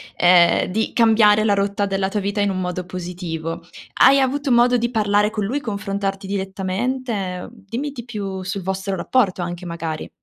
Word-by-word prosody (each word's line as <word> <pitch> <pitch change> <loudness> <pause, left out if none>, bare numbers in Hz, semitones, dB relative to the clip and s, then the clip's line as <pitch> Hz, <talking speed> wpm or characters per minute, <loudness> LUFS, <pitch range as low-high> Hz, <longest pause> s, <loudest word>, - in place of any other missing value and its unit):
ehm, 175 -1 +5
di 220 +4 -2
cambiare 220 -2 +5
la 205 -2 +3
rotta 200 0 0
della 195 -1 -1
tua 205 +1 -2
vita 200 +1 -2
in 200 -1 +2
un 185 0 -2
modo 180 0 -3
positivo. 175 -2 -6 0.3
Hai 275 +1 +7
avuto 280 +2 0
modo 245 +1 +4
di 235 0 -1
parlare 210 -2 +2
con 215 -2 -3
lui, 255 +9 -1
confrontarti 200 -3 -3
direttamente? 195 +1 -3
Mhmm, - - -9 0.2
dimmi 275 +7 -3
di 240 -3 -8
più 195 -5 -5
sul 195 +1 -4
vostro 190 +1 -2
rapporto 190 -3 +1
anche 175 +1 -5
magari. 165 -2 -5
200 Hz, 175 wpm, -21 LUFS, 185-225 Hz, 0.3 s, Hai